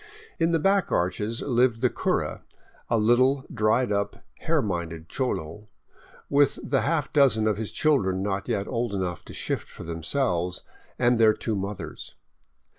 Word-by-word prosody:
In 165 0 +3
the 170 - +3
back 195 +3 +2
arches 105 +6 0
lived 120 -3 +2
the 125 - +4
cura, - - -1 0.5
a 115 - +2
little, 130 +5 +3
dried 110 +1 +2
up, 100 0 -2 0.2
hare 160 -3 +1
minded 85 -4 -4
cholo, 105 - -3 0.6
with 145 -1 +3
the 135 -1 +1
half 160 0 -1
dozen 130 -7 +4
of 105 -2 +1
his 110 -1 -4
children 95 -12 +1
not 100 -1 -2
yet 105 -5 -1
old 115 -4 -2
enough 90 -4 -3
to - - -10
shift - - -2
for - - -10
themselves, 85 - -1 0.3
and 120 -1 +3
their 110 -1 +5
two 110 - -2
mothers. 100 +1 -6
110 Hz, 155 wpm, -26 LUFS, 95-130 Hz, 0.6 s, their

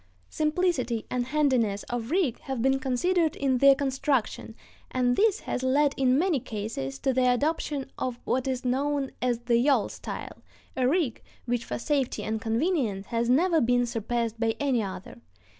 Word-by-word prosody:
Simplicity 305 -8 0
and 245 -1 -1
handiness 260 -8 +1
of 240 -1 -4
rig 325 -8 +1
have 265 -2 -5
been 265 +3 +2
considered 315 +6 +1
in 265 -3 +1
their 275 +1 +7
construction, 270 -4 -1 0.3
and 245 -1 +1
this 430 - +2
has - - -3
led 275 +2 +2
in 260 -1 +3
many 335 -2 +2
cases 205 - -5
to 265 - 0
the 255 0 +3
adoption 290 +1 -1
of 250 -2 -2
what 260 +1 0
is 260 -1 -2
known 275 +2 0
as 240 -1 0
the 240 -1 +2
yawl 255 -3 +3
style, - - -7 0.3
a 255 -1 +1
rig 290 -5 0 0.2
which 240 -1 -1
for - - -4
safety 275 0 -1
and 220 0 -2
convenience 230 - 0
has 235 +2 -1
never 325 +5 +3
been 245 +1 +2
surpassed 230 0 -2
by 225 -1 +1
any 270 -5 +1
other. 185 - -7
255 Hz, 165 wpm, -27 LUFS, 235-285 Hz, 0.3 s, their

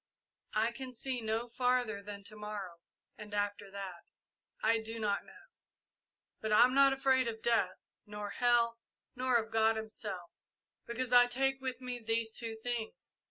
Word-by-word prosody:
I 220 +2 +3
can 255 +1 -7
see 255 +1 -2
no 225 +2 -1
farther 245 -3 +1
than 200 0 -8
to 215 +1 -6
morrow, 205 -5 -6 0.4
and 210 0 -7
after 205 -1 -1
that 195 -3 -7 0.6
I 225 +1 +4
do 225 +1 -5
not 205 -2 0
know. - - -15 1.0
But 220 - -2
I'm 245 +4 +6
not 275 0 +6
afraid 265 -2 +3
of 220 -1 -5
death, 225 -6 +2 0.3
nor 210 -1 -5
hell, 235 0 +3 0.4
nor 255 0 +1
of 225 -1 +2
God 225 0 +4
Himself, 210 -5 -5 0.6
because 250 +1 -2
I 245 0 +8
take 270 +2 0
with 260 -1 -4
me 250 -1 -4
these 225 0 0
two 225 -1 -3
things. 240 -3 -4
225 Hz, 160 wpm, -33 LUFS, 210-245 Hz, 1.0 s, I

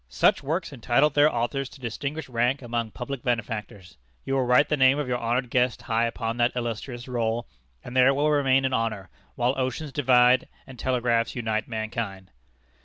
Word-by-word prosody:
"Such - - +3
works 160 +3 -3
entitle 135 +4 +2
their 145 +2 +4
authors 135 +3 -2
to - - -15
distinguished 140 +5 -4
rank 125 +2 0
among 115 -1 -2
public 125 +3 -6
benefactors. 105 - -4 0.3
You 135 - -2
will 135 -2 +1
write 125 +4 +4
the 150 - +1
name 130 0 +4
of 150 -3 -2
your 125 -1 -1
honored 120 +1 -1
guest 125 -1 +1
high 115 0 +1
upon 115 0 -3
that 120 +1 +1
illustrious 120 +1 -4
roll, 115 -1 -1 0.4
and 125 - -9
there 130 0 +6
it 135 - +5
will 150 +2 +2
remain 135 -2 +3
in 130 - 0
honor, 110 -6 -2 0.2
while 125 +2 +1
oceans 130 +3 -2
divide 125 -2 +4 0.2
and 130 -3 -13
telegraphs 120 -2 0
unite 110 -3 -2
mankind." 110 -4 -5
125 Hz, 180 wpm, -25 LUFS, 115-135 Hz, 0.4 s, there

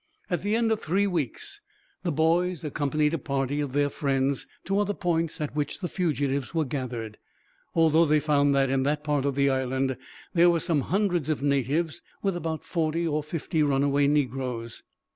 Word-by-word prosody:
At 175 - 0
the 205 +3 0
end 230 -1 +2
of 220 - 0
three 190 +6 +1
weeks, 200 - -2 0.4
the 175 - -1
boys 165 +3 +1
accompanied 150 +1 0
a 165 - 0
party 135 +1 -1
of 140 -3 -3
their 145 0 +3
friends 135 -1 0 0.2
to 195 +1 +1
other 205 0 0
points 165 -3 -1
at 150 -1 -3
which 150 -1 -2
the 185 - -3
fugitives 145 -6 -1
were 160 -2 +2
gathered. 120 -5 -5 0.6
Altogether 165 0 +5
they 150 0 +5
found 145 -2 +3
that, 135 -1 +2
in 135 0 +2
that 145 +2 0
part 145 -2 0
of 140 -2 0
the 140 0 +3
island, 130 0 0 0.4
there 175 -1 +6
were 170 -1 +3
some 160 -4 +1
hundreds 180 -3 0
of 150 -3 -1
natives, 145 +4 0 0.2
with 195 -2 +1
about 165 -2 -3
forty 165 0 -1
or 150 -1 0
fifty 155 +1 -2
runaway 140 0 +3
negroes. 130 -5 -1
150 Hz, 180 wpm, -27 LUFS, 140-170 Hz, 0.6 s, there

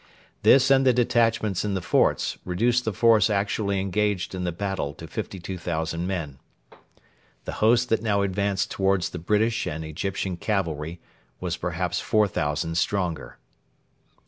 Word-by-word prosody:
This 135 0 +5
and 135 0 +5
the 130 -1 +5
detachments 115 -5 +1
in 105 -2 -1
the - - 0
forts - - +1
reduced 120 +7 +1
the 110 - 0
force 110 +1 +4
actually 100 -1 0
engaged 100 0 -1
in 90 -1 -3
the 90 - 0
battle 90 -5 -3
to - - -9
52,000 85 -2 -4
men. 80 -8 -4 1.1
The - - -4
host 120 +3 +4
that 115 - +2
now 100 -3 +1
advanced 100 0 -1
towards 95 -3 +1
the 90 - -6
British 105 +6 +1
and 80 +1 -4
Egyptian 95 +3 -3
cavalry 85 -5 -2 0.4
was 90 -2 -2
perhaps 90 +1 -2
4,000 80 -6 0
stronger. 90 -4 -2
95 Hz, 140 wpm, -25 LUFS, 85-105 Hz, 1.1 s, This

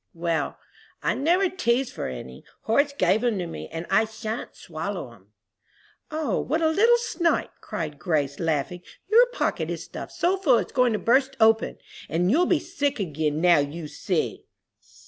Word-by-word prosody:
"Well, 165 -1 -1 0.5
I - - +2
never 350 +7 +2
teased 265 -9 0
for - - -4
any. 65 0 -8 0.2
Horace 280 +6 +2
gave 200 -4 +2
'em 235 -4 +1
to 180 - -2
me, 165 - -7
and 165 +1 -6
I 215 +3 +4
shan't 220 +1 -6
swallow 165 -5 -5
'em." 100 -4 -21 0.8
"O, 310 -1 -1
what 310 +6 0
a 320 - +4
little 455 +9 +5
snipe," 345 -7 0
cried 150 -3 -5
Grace, 145 -6 -1
laughing, 165 +1 -1 0.3
"your 480 +3 +7
pocket - - -2
is - - -4
stuffed - - -8
so 360 +3 +1
full 295 -11 +4
it's - - -2
going 250 -2 +3
to - - +1
burst 265 +5 +2
open, 225 0 +3 0.3
and 175 +4 +1
you'll 345 +7 +3
be 350 - +4
sick 285 -2 -2
again, 155 -4 -1
now 175 -3 +6
you 150 +3 -3
see!" - - -2
220 Hz, 170 wpm, -25 LUFS, -, 0.8 s, your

